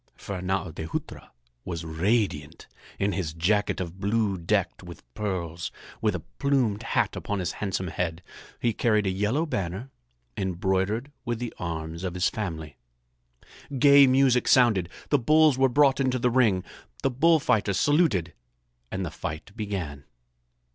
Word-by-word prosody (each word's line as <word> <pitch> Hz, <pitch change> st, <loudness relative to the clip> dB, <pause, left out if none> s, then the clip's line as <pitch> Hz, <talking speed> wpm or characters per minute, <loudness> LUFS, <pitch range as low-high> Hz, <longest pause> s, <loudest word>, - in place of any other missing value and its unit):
Fernâo 95 Hz, -3 st, -3 dB
de 80 Hz, -, -5 dB
Hutra -, -, -6 dB, 0.3 s
was 85 Hz, -2 st, -5 dB
radiant 80 Hz, -2 st, -1 dB, 0.3 s
in 100 Hz, +1 st, +1 dB
his 90 Hz, -6 st, -3 dB
jacket 105 Hz, +6 st, +1 dB
of 90 Hz, 0 st, -5 dB
blue 105 Hz, 0 st, +1 dB
decked 90 Hz, +1 st, -1 dB
with 85 Hz, -3 st, -11 dB
pearls, 85 Hz, -5 st, -3 dB, 0.3 s
with 105 Hz, -3 st, +1 dB
a 85 Hz, -, -4 dB, 0.2 s
plumed 130 Hz, -8 st, +1 dB
hat -, -, 0 dB
upon 105 Hz, -, -3 dB
his 90 Hz, -3 st, -2 dB
handsome 95 Hz, -3 st, -2 dB
head. 85 Hz, +1 st, -3 dB, 0.4 s
He 115 Hz, -, +1 dB
carried 105 Hz, -1 st, +2 dB
a 95 Hz, -, +1 dB
yellow 105 Hz, -, 0 dB
banner 100 Hz, -, -4 dB, 0.4 s
embroidered 95 Hz, +6 st, -1 dB
with 120 Hz, -3 st, -2 dB
the 120 Hz, 0 st, -5 dB
arms 80 Hz, 0 st, -4 dB
of 90 Hz, -1 st, -3 dB
his 90 Hz, +1 st, +2 dB
family. 80 Hz, -9 st, -5 dB, 1.0 s
Gay 140 Hz, 0 st, +7 dB
music 130 Hz, -1 st, +3 dB
sounded. 110 Hz, -9 st, +4 dB, 0.2 s
The 145 Hz, -, +3 dB
bulls 155 Hz, +3 st, +5 dB
were 135 Hz, 0 st, +5 dB
brought 140 Hz, +1 st, +4 dB
into 130 Hz, -1 st, +1 dB
the 125 Hz, 0 st, +1 dB
ring. 110 Hz, -7 st, +3 dB, 0.4 s
The -, -, +2 dB
bullfighters 125 Hz, -, +3 dB
saluted 145 Hz, -, +2 dB, 0.6 s
and 95 Hz, 0 st, -2 dB
the 80 Hz, -, -5 dB
fight 80 Hz, +5 st, -6 dB
began. 90 Hz, -, -4 dB
100 Hz, 145 wpm, -26 LUFS, 85-120 Hz, 1.0 s, Gay